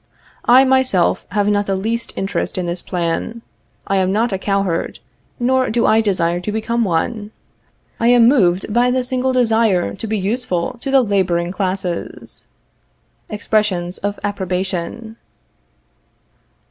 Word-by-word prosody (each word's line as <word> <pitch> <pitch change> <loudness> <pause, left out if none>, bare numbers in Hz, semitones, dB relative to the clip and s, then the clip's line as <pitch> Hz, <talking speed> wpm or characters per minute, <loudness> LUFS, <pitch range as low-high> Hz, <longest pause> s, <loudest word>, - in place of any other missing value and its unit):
I, 255 +2 +6
myself, 260 -9 +2
have 205 +1 0
not 205 -1 +1
the 195 - 0
least 225 +4 -2
interest 195 -2 -2
in 180 - -1
this 175 +1 -3
plan. 180 +6 -3 0.4
I 195 - 0
am 190 0 +1
not 220 +2 +1
a 190 - -2
cowherd, 195 -4 -1 0.4
nor 255 +1 +2
do 235 +1 +1
I 220 +1 +4
desire 175 -5 0
to 195 +4 -4
become 230 +2 -1
one. 205 +4 -1 0.7
I 230 - +2
am 240 -1 +6
moved 195 -6 +2
by 240 +2 +3
the 255 0 +1
single 255 +1 -1
desire 225 -7 +2
to 220 - -6
be 215 0 -1
useful 210 +1 -2
to 270 - -5
the 270 -1 +4
laboring 180 -5 0
classes. 185 -2 -3 0.8
[Expressions 205 -4 0
of 205 0 -3
approbation. 195 +3 -3
205 Hz, 140 wpm, -18 LUFS, 185-235 Hz, 0.8 s, I